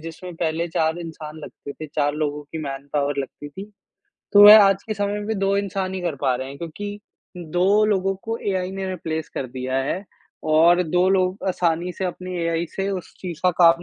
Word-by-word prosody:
जिसमें 165 +2 -8
पहले 165 0 -1
4 160 0 0
इंसान 160 -2 -8
लगते 145 -2 -9
थे, 155 - -8
4 145 -1 0
लोगों 150 -1 -2
की 150 +3 -8
मैनपावर 140 0 -2
लगती 140 +2 -5
थी। 195 +8 -10 0.6
तो 205 - +8
वह 210 +1 +11
आज 195 0 +3
के 215 - -4
समय 205 0 -1
में 210 0 -3
2 195 0 +1
इंसान 195 -1 -2
ही 190 - -3
कर 175 -3 -2
पा 130 -3 +2
रहे 130 +1 -5
हैं। 140 +1 -9
क्योंकि 205 +6 -6 0.4
2 180 +5 +2
लोगों 195 -2 +1
को 225 +1 -3
एआई 185 -1 -1
ने 195 0 -4
रिप्लेस 160 -3 -4
कर 135 - -3
दिया 130 +1 -4
है 180 +8 -3 0.5
और 170 +3 +6
2 180 +2 +2
लोग 185 0 +1
आसानी 175 -1 0
से 190 - -4
अपनी 185 0 -4
एआई 165 0 0
से 195 0 -1
उस 185 -3 -5
चीज़ 175 -4 -6
का 180 - +5
काम 170 +1 +6
175 Hz, 205 wpm, -23 LUFS, 155-195 Hz, 0.6 s, वह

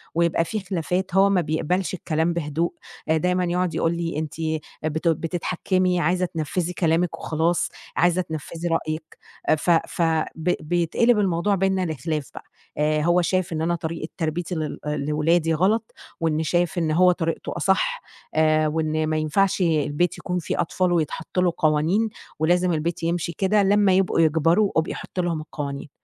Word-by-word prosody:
ويبقى 170 0 +2
فيه 215 +5 -3
خلافات، 180 0 -2
هو 195 +1 +6
ما 190 -2 +3
بيقبلش 170 +4 -1
الكلام 165 -1 0
بهدوء. 165 +1 -1 0.4
آآ، 160 - +4
دايمًا 180 +3 +1
يقعد 180 0 -1
يقول 165 +1 +1
لي 165 -2 -2
أنتِ 155 -1 -4 0.5
بتو 160 +2 +1
بتتحكمي، 180 +2 0
عايزة 180 +3 +1
تنفذي 170 +1 -2
كلامِك 170 0 +1
وخلاص، 165 +2 0 0.3
عايزة 175 +1 +3
تنفذي 165 0 -5
رأيِك. 160 -1 -1 0.5
آآ - - +6
ف 155 - -3
ف 170 +1 +2 0.3
ب 165 +2 0
بيتقلب 175 +8 +2
الموضوع 195 +1 +1
بينا 190 0 +1
لخلاف 155 -1 -3
بقى. - - -9 0.3
آآ، 150 0 +2
هو 175 +3 +3
شايف 185 0 0
إن 155 - -2
أنا 170 +2 +1
طريقة 160 -1 -4
تربيتي 170 +2 -2
لل 155 -2 -3
آآ، 150 0 -1
لولادي 155 +3 +1
غلط، 205 +7 +1 0.3
وإنه 160 -1 0
شايف 175 +2 0
إن 165 -2 +1
هو 180 +3 +5
طريقته 165 -2 -3
أصح، 485 - +1 0.3
آآ، 155 0 +3
وإن 155 0 0
ما 155 0 0
ينفعش 190 +6 +1
البيت 160 0 +1
يكون 180 0 -2
فيه 165 - -2
أطفال 180 +2 0
ويتحط 160 +1 -1
له 180 -2 +2
قوانين، 160 +8 +2 0.3
ولازم 175 +3 +2
البيت 165 +2 -2
يمشي 170 0 -1
كده، 205 +2 +3
لمّا 200 0 +4
يبقوا 185 -2 +2
يكبروا 165 +5 +3
ابقي 160 - +1
حطي 185 - -4
لهم 170 -3 -1
القوانين. 145 -2 -6
170 Hz, 165 wpm, -23 LUFS, 155-180 Hz, 0.5 s, هو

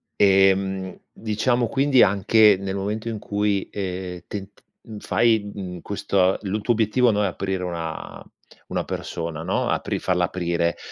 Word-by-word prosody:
Ehm, 95 -1 +3
diciamo 115 +2 0
quindi, 135 0 +4
anche, 100 +2 +5
nel 95 0 -4
momento 105 +4 -3
in 110 -2 -4
cui, 100 -1 -1
ehm, 90 -2 -5
tent 100 0 -8 0.2
mhmm, 110 -2 -9
fai, 110 -3 +1
mhmm, 90 -4 -7
questo 95 -2 +1
lu 100 +2 -2
tuo 120 - +2
obiettivo, 115 +2 +2
no, 105 0 +1
è - - +2
aprire 95 0 -3
una 85 -3 -5 0.4
una - - -2
persona, 80 -2 -5
no, - - -1
apri - - -1
falla 90 -1 +1
aprire, 85 -1 -1
100 Hz, 150 wpm, -23 LUFS, 90-105 Hz, 0.4 s, anche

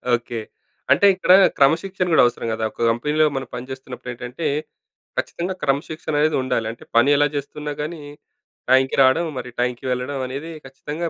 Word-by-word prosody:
Okay. 120 -1 -5 0.5
అంటే 200 - +5
ఇక్కడ 185 -1 +1 0.3
క్రమశిక్షణ 175 +7 +2
కూడా - - +6
అవసరం 120 -1 -1
కదా! 110 0 -3
ఒక 115 - -2
కంపెనీ‌లో 150 +6 +1
మనం 135 -2 -3
పనిచేస్తున్నప్పుడేంటంటే, 125 +2 -6 0.7
ఖచ్చితంగా 180 +2 -2
క్రమశిక్షణ 150 +3 -2
అనేది 155 0 +2
ఉండాలి. 115 -3 -1
అంటే 115 - -13
పని 140 +5 +5
ఎలా 145 0 +4
చేస్తున్నా 145 +1 -4
కానీ, 155 +1 -5 0.7
టైంకి 130 0 +4
రావడం, 145 +6 +3
మరి 125 - -7
టైంకి 125 +1 -2
వెళ్ళడం 125 +2 -2
అనేది 140 +6 -6 0.2
ఖచ్చితంగా 150 +5 -5
135 Hz, 145 wpm, -21 LUFS, 125-155 Hz, 0.7 s, కూడా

